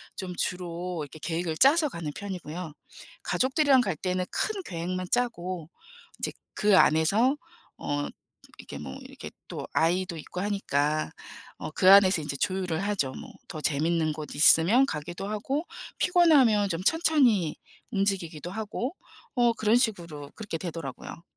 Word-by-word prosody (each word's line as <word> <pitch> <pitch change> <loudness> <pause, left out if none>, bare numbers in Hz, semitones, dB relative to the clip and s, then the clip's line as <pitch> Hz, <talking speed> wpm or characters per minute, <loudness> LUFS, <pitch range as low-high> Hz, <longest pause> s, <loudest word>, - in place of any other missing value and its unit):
좀 185 -2 -5
주로 175 -1 -3
이렇게 150 +2 -11
계획을 165 0 -2
짜서 300 +3 +5
가는 165 - -5
편이고요. 180 -4 -6 0.5
가족들이랑 270 0 +3
갈 195 -8 -1
때는 185 +1 -1
큰 415 -2 -2
계획만 180 +1 -4
짜고 185 -9 -1 0.5
이제 - - -1 0.2
그 205 -2 +4
안에서 195 - +4 0.4
어 145 0 -2 0.5
이렇게 - - -9
뭐 65 - -7
이렇게 - - -10 0.2
또 - - -6
아이도 175 +2 +1
있고 180 +3 -6
하니까 155 -7 0 0.5
어 - - -6
그 185 +3 +4
안에서 190 -4 +7
인제 140 -2 -4
조율을 185 -3 -1
하죠. 165 -11 0
뭐. - - -9 0.2
더 155 - -7
재미있는 155 +2 +1
곳 150 -1 -7
있으면 170 - +6
가기도 175 - -5
하고, 265 +10 -2 0.3
피곤하면 275 - +4
좀 165 0 -2
천천히 260 - +3 0.4
움직이기도 185 -6 -1
하고. 220 - -4 0.4
어 240 -1 +3
그런 220 0 +2
식으로 170 - -1
그렇게 210 -7 -5
되더라고요. 165 -2 -7
185 Hz, 310 characters per minute, -27 LUFS, 160-220 Hz, 0.5 s, 안에서